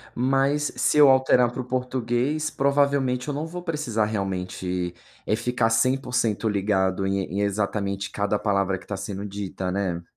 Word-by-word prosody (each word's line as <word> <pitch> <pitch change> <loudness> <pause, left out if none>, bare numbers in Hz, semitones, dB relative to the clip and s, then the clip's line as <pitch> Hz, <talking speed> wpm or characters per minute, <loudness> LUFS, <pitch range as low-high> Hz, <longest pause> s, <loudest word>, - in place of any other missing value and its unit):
mas 135 +4 +1
se - - +2
eu 145 -2 +8
alterar 130 -2 +4
para 125 - -8
o - - -6
português 125 +4 -1
provavelmente 140 -2 +1
eu 145 - -2
não 150 +3 -3
vou 175 +2 -6
precisar 150 - -1
realmente, 90 -3 -3 0.3
eh, 105 - +1
ficar 120 -1 0
100% 120 -3 +1
ligado 95 -2 +1
em 95 0 0
em 100 +3 -3
exatamente 100 -1 -1
cada 100 0 -1
palavra 100 -2 0
que - - -18
tá 100 - -3
sendo 100 -1 -5
dita, 95 -2 -4
né? 95 -3 -1
110 Hz, 160 wpm, -24 LUFS, 100-130 Hz, 0.3 s, eu